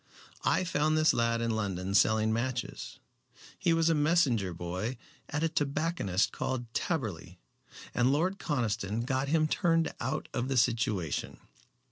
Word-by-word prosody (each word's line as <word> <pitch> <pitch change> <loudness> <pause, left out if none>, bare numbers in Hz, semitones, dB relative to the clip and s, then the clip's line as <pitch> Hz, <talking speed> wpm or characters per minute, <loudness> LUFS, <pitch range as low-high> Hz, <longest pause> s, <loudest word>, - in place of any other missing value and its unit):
I - - +2
found 155 -3 +1
this 155 0 +4
lad 115 0 +1
in 115 0 0
London 95 -3 -2
selling 110 +2 +3
matches. 130 +2 -3 0.6
He 180 -3 +2
was 165 0 +3
a 165 - +4
messenger 145 - +2
boy 90 +8 -4 0.3
at 150 +2 -2
a - - +4
tobacconist 145 - 0
called 120 -3 -4
Taberley, 100 - -3 0.6
and 125 +1 +3
Lord 180 +7 +1
Conniston 115 - -1
got 130 +1 0
him 155 +1 +2
turned 165 0 +1
out 130 +3 -2
of 120 +1 -1
the 135 -1 0
situation." 110 - 0
125 Hz, 140 wpm, -30 LUFS, 110-155 Hz, 0.6 s, this